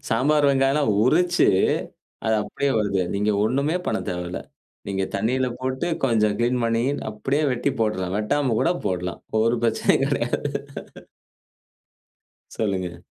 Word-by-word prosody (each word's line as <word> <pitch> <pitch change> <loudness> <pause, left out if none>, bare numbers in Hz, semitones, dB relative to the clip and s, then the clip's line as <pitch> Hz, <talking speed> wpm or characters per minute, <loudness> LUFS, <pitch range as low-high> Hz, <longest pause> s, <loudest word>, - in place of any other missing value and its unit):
சாம்பார் 145 +5 +3
வெங்காயம்லாம் 135 -2 +2
உரிச்சு, 175 +6 +3 0.8
அது 110 - +3
அப்டீயே 140 +5 -2
வருது. 100 -2 0
நீங்க 105 +2 +1
ஒண்ணுமே 140 +8 +1
பண்ணத்தேவையில்ல. 90 -5 -3 0.5
நீங்க 95 -1 -1
தண்ணியில 125 +5 0
போட்டு, 130 +5 -2 0.2
கொஞ்சம் 110 -4 +2
க்ளீன் 120 +1 +1
பண்ணி, 115 +1 +1 0.3
அப்டீயே 135 +8 -1
வெட்டி 125 +3 -1
போட்றலாம். 95 -4 -1
வெட்டாம 130 +2 0
கூட 170 - +2 0.2
போடலாம், 90 -2 -3 0.2
ஒரு 115 +1 +2
பிரச்சனையும் 115 - +2
கெடையாது. - - -1 2.1
சொல்லுங்க. 95 -5 -3
115 Hz, 115 wpm, -23 LUFS, 100-135 Hz, 2.1 s, சாம்பார்